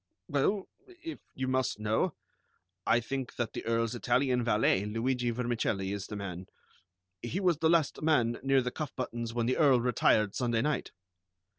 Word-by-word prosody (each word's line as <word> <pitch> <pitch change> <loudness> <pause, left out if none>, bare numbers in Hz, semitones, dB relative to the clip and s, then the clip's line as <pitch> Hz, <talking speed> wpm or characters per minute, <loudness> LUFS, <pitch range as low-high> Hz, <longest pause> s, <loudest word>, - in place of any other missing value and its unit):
"Well, 185 +8 +1 0.2
if 350 -3 -9 0.2
you 130 0 -2
must 130 -3 0
know, 110 +1 0 0.7
I 120 - +5
think 130 +1 -4
that 120 -2 -2
the - - -5
Earl's 115 0 +1
Italian 125 +1 +1
valet, 105 -4 +3
Luigi 120 +4 -1
Vermicelli, 115 -5 -1
is 100 -1 -5
the 105 - -6
man. 95 -2 -6 0.7
He 120 +10 -3
was 180 -5 +2
the 160 - +3
last 165 -3 +2
man 120 -7 +2
near 135 0 +3
the 125 - -2
cuff 155 +1 -5
buttons 120 -2 -3
when 120 -1 +1
the 130 - +1
Earl 140 -5 +5
retired 110 -3 +2
Sunday 120 -2 0
night." 150 -2 -1
120 Hz, 165 wpm, -30 LUFS, 115-135 Hz, 0.7 s, I